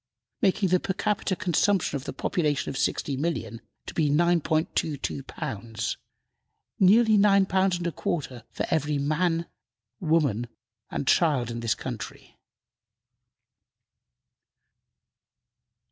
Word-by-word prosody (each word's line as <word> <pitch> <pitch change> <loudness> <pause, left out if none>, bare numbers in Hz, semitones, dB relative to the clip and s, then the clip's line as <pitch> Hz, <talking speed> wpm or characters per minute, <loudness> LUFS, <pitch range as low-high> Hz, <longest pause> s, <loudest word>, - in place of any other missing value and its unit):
making 195 -2 +2
the 185 +1 +4
per 190 - -2
capita 205 -1 0
consumption 180 0 +1
of 135 0 -4
the - - -3
population 150 -7 -1
of - - -8
60,000,000 135 -5 -2 0.3
to - - -7
be 155 -3 +1
9.22 155 -2 +1
pounds, 115 -6 -4 0.8
nearly 215 +3 +6
nine 200 -1 +5
pounds 190 -1 +2
and 175 - -5
a 170 - 0
quarter 135 -8 -3
for - - -3
every 150 -1 +1
man, 165 +4 0 0.5
woman 150 - +1 0.4
and 140 - -4
child 140 -8 +3
in 115 - -4
this 115 -1 0
country. 115 -7 -7
160 Hz, 110 wpm, -26 LUFS, 135-185 Hz, 0.8 s, nearly